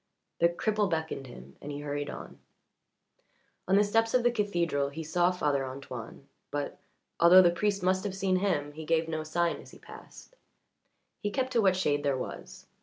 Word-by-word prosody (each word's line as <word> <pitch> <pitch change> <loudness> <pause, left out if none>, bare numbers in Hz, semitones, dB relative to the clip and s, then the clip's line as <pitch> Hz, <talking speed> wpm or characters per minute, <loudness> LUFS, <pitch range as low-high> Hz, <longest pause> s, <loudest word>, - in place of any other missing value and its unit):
The 170 - +5
cripple 210 +3 0
beckoned 160 -5 -3
him 70 - -13
and 145 - -6
he 145 0 -5
hurried 145 0 -3
on. - - -9 1.3
On 190 - +3
the 205 - +6
steps 225 +3 +1
of 250 - +3
the 240 - +4
cathedral 175 -10 0
he 160 +3 -6
saw 175 +3 +2
Father 145 -6 0
Antoine, 130 -1 -8 0.2
but, 145 -1 -4 0.4
although 180 +2 +8
the 175 - +5
priest 200 +2 -1
must 185 +1 +2
have 200 -2 -3
seen 190 -1 +1
him, 180 -7 0
he 155 +2 -8
gave 160 +1 +1
no 160 -1 -3
sign 170 +2 0
as - - -13
he - - -14
passed. - - -14 0.8
He 205 - -2
kept 260 +4 -2
to 235 - +3
what 190 -2 +4
shade 145 -6 +1
there 140 -2 0
was. 125 - -7
170 Hz, 185 wpm, -29 LUFS, 145-195 Hz, 1.3 s, although